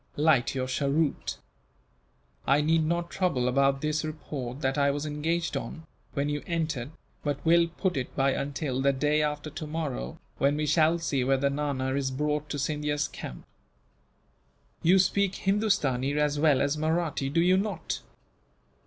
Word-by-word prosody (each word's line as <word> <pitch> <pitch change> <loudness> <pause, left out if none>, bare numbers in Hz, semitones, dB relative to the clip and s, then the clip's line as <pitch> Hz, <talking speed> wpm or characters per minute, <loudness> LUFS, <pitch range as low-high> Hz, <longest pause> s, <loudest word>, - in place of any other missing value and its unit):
"Light 145 -4 +3
your 130 -1 0
cheroot. 140 +3 0 1.1
I 140 +2 +5
need 160 +2 +3
not 170 +2 -1
trouble 155 -10 +1
about 135 +1 +2
this 155 0 0
report 145 -4 -5
that 135 0 +1
I 140 -1 +3
was 145 +2 -2
engaged 160 +3 -1
on, 160 - -5 0.3
when 140 +1 0
you 145 0 -2
entered, 160 -7 -2 0.3
but 145 0 -2
will 170 +1 +5
put 175 +2 -2
it 130 -2 -4
by 135 0 +3
until 140 -1 -2
the 140 0 +3
day 150 +3 +2
after 150 0 -2
tomorrow, 150 - -4 0.2
when 140 +2 +3
we 155 - 0
shall 155 +2 +4
see 145 -6 0
whether 135 +1 +2
Nana 140 -2 -1
is 135 -1 0
brought 150 +2 -1
to 145 - -3
Scindia's 150 +1 -1
camp. 60 - -8 1.4
"You 180 +4 +5
speak 195 +1 +2
Hindustani 150 - +1
as 150 -1 +1
well 145 -4 +4
as 145 +2 0
Mahratti, 160 -3 0
do 160 +4 +1
you 180 +2 +5
not?" 205 +2 -2
150 Hz, 155 wpm, -28 LUFS, 140-160 Hz, 1.4 s, I